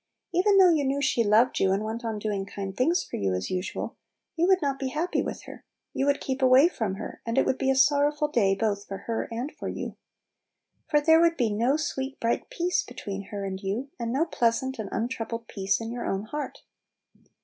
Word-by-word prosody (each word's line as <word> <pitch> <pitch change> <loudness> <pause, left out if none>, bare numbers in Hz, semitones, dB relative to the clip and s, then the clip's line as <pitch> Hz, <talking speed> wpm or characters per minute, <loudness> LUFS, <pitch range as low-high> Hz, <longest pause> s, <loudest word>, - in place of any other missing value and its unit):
Even 390 +3 +4
though 370 -3 +7
you 300 -3 +1
knew 275 +1 0
she 255 -4 +2
loved 220 +4 +3
you 190 - +3
and 195 +2 +1
went 225 +2 -4
on 225 -2 -2
doing 205 -2 -2
kind 195 -1 -6
things 330 - +2
for - - -6
you 95 -2 0
as 90 0 -3
usual, 185 +1 -3 0.4
you 335 +2 +2
would 380 -1 +5
not 275 -4 -1
be 270 - -2
happy 320 +7 -1
with - - -5
her; - - -11 0.3
you 270 - 0
would 285 0 +2
keep 265 0 -3
away 260 +4 +7
from 220 - -2
her, - - -8
and 230 0 -3
it - - +4
would 260 - 0
be 270 - +1
a 270 - +3
sorrowful 290 +2 +3
day 205 -9 +2
both 205 -1 -1
for 195 - -7
her 230 -1 -2
and 245 +6 -3
for - - -7
you. - - -5 0.9
For 295 -1 +4
there 320 +2 +6
would 335 0 +3
be 235 -4 +1
no 240 +7 +2
sweet, 275 -3 -3
bright 230 0 -1
peace 355 +1 0
between 200 -1 -7
her 200 0 -5
and 190 0 -4
you, 220 +8 -3
and 230 -1 -2
no 280 +6 +2
pleasant 260 -2 0
and 210 -3 -4
untroubled 230 -1 -3
peace 195 -1 0
in 225 0 -5
your 240 0 -4
own 195 +1 -1
heart. 295 +7 -6
240 Hz, 225 wpm, -27 LUFS, 205-285 Hz, 0.9 s, though